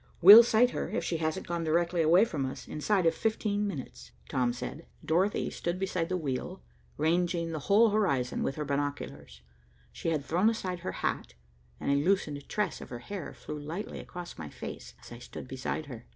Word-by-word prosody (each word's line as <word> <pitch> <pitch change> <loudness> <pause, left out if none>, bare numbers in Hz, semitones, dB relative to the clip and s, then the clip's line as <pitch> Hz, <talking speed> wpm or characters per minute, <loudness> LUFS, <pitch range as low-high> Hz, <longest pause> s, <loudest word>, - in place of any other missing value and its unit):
"We'll 205 +6 +12
sight 240 +1 +3
her, - - -3
if - - -2
she 170 - -1
hasn't 155 -1 -2
gone 170 -1 -2
directly 170 +2 +1
away 170 +7 +6
from 150 -11 -3
us, 130 0 -5
inside 185 +4 0
of 165 - +4
fifteen 210 +1 -1
minutes," 130 - -7 0.2
Tom 125 -2 +1
said. 125 +6 -7 0.2
Dorothy 185 +6 +1
stood 175 +1 -3
beside 185 -3 -2
the 185 - 0
wheel, 130 - -4 0.3
ranging 170 +2 +1
the 160 - -3
whole 215 +2 +6
horizon 140 -13 +1
with 135 - -1
her 150 - -3
binoculars. 140 - -4 0.5
She 65 - -3
had 150 -4 -1
thrown 180 +7 +3
aside 185 -6 -3
her 180 - -4
hat, 65 - -2 0.4
and - - -1
a 140 +1 +2
loosened 150 -6 0
tress 210 -5 -1
of - - -9
her 120 - -5
hair 180 +8 -6
flew 150 - -7
lightly 160 +8 -6
across 175 - -9
my 75 -2 -6
face - - -8
as - - -14
I 120 - -9
stood 125 - -9
beside 130 +4 -4
her. 120 -5 -10
165 Hz, 195 wpm, -30 LUFS, 140-185 Hz, 0.5 s, We'll